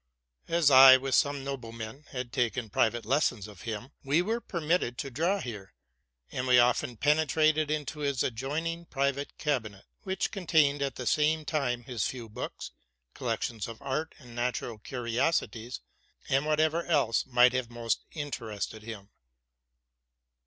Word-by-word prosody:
As 165 -4 +3
IJ, 130 0 +10
with 135 0 -3
some 140 0 +2
noble 135 -4 -5
men, 115 +5 -8
had 125 -2 -5
taken 120 -3 -1
private 115 +3 +1
lessons 120 -5 +1
of 105 -5 -13
him, 115 +5 -5
we 145 +3 +2
were 225 +4 -1
permitted 165 - -1
to 140 - -4
draw 170 +10 +1
here; 105 - -7 0.6
and 125 +1 -3
we 125 -1 +6
often 120 -1 +3
penetrated 155 +2 +2
into 150 0 -3
his 140 -3 0
adjoining 155 +8 -3
private 140 -1 -1
eabinet, 115 -10 -2 0.2
which 190 -1 -2
contained 155 -7 +2
at 140 -1 -1
the 125 - -6
same 155 +3 +2
time 130 -7 -1
his 115 -6 -2
few 120 -3 -6
books, 115 +4 -6 0.4
collections 115 -3 -3
of 115 -1 -9
art 140 +4 -3
and 125 -4 -14
natural 120 -2 -2
curiosities, 120 +1 -2 0.5
and 135 +3 +1
whatever 155 +2 +2
else 140 -9 +2
might 125 0 +5
have 130 -2 -1
most 120 -1 -1
interested 115 -8 -5
him. 105 -2 -9
130 Hz, 145 wpm, -29 LUFS, 120-150 Hz, 0.6 s, IJ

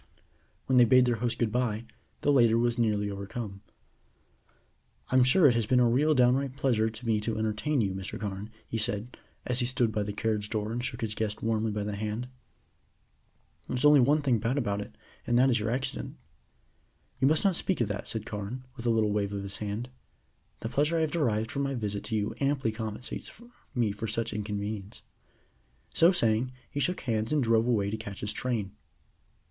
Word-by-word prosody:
When 130 -1 +4
they 120 - +8
bade 130 +1 +6
their 120 -2 +1
host 120 +1 -1
good 115 -3 0
bye, 120 -2 -1 0.4
the 145 - +3
later 120 -5 +5
was 120 +1 +1
nearly 105 -3 +1
overcome. 100 0 -6 1.5
"I'm 130 0 +5
sure 150 +7 +5
it 125 - +5
has 115 -2 0
been 125 +1 +4
a 125 - +5
real 145 +6 +3
downright 130 +1 +2
pleasure 115 -6 +2
to 110 +2 -10
me 110 -2 +2
to 110 +1 -2
entertain 110 +6 0
you, 95 -3 0
Mr. 95 +1 -5
Carne," 100 0 -5 0.2
he 115 - -3
said, 110 +1 -2 0.3
as 125 0 0
he 120 - +1
stood 125 -3 +1
by 105 - -1
the 105 0 -2
carriage 105 0 -1
door 110 -1 -2
and 120 +1 -3
shook 130 - -4
his 110 -2 -2
guest 105 -1 -3
warmly 110 0 +1
by 105 0 -2
the 105 0 -3
hand. 110 +4 -3 1.4
"There - - -2
is 130 - 0
only 150 -1 +8
one 145 +4 +3
thing 125 -5 +2
bad 115 +5 -1
about 105 -6 0
it, - - -10 0.3
and 120 - +3
that 130 +2 +5
is 120 - +2
your 105 +1 -1
accident." 130 +3 -3 1.0
"You 130 - +4
must 155 +2 +3
not 195 -3 +3
speak 185 +1 -1
of 120 - +2
that," 105 - -4
said 110 -2 -4
Carne, 105 +5 -5
with 120 -2 -5
a - - +4
little 110 -2 +2
wave 100 -1 0
of 100 -1 -3
his 100 0 -5
hand. 105 +3 -4 0.7
"The 115 - -3
pleasure 150 +7 +1
I - - +2
have 155 -2 0
derived 115 -9 0
from 140 - -2
my 140 -1 -1
visit 105 -4 -3
to 110 - -2
you 105 -1 -1
amply 135 -4 +1
compensates 110 +2 -6 0.4
me 115 -4 +2
for 105 +2 -5
such 115 +1 -1
a - - -6
minor - - -1
inconvenience." 105 -1 -5 0.9
So 170 +2 +6
saying 120 - +1 0.2
he 145 - -3
shook 180 +6 0
hands 110 -2 -1
and 150 -3 +2
drove 115 0 +3
away 100 -5 +1
to 110 - -2
catch 100 -2 -8
his 105 0 -1
train. 110 -5 -2
115 Hz, 210 wpm, -29 LUFS, 105-130 Hz, 1.5 s, they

